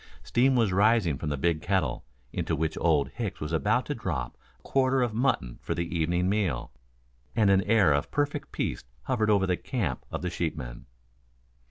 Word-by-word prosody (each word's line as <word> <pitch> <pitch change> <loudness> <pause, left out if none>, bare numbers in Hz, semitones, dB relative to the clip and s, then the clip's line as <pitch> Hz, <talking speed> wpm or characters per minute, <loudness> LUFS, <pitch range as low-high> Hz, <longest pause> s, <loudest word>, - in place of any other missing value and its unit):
Steam 130 - +3
was 115 -6 +2
rising 100 - +3
from 75 - -3
the 75 - -1
big 80 +2 +1
kettle, 95 -11 0 0.3
into - - -1
which 80 +1 -1
Old 75 -4 +3
Hicks 105 -6 -5
was 75 +1 -4
about 80 -4 +1
to - - -2
drop 60 -1 -3 0.2
a - - -33
quarter 130 -1 +2
of 120 -3 -1
mutton 110 - 0
for - - -3
the 85 +1 -3
evening 85 +2 +1
meal, 95 - 0 0.6
and 105 -3 +4
an 95 -1 +5
air 105 -8 +4
of 70 - 0
perfect 145 0 -2
peace - - -2 0.2
hovered 110 -1 0
over 100 -2 +4
the 90 -2 0
camp 95 - -3
of - - -5
the 90 - -2
sheepmen. 65 -8 -4
90 Hz, 185 wpm, -28 LUFS, 75-110 Hz, 0.6 s, an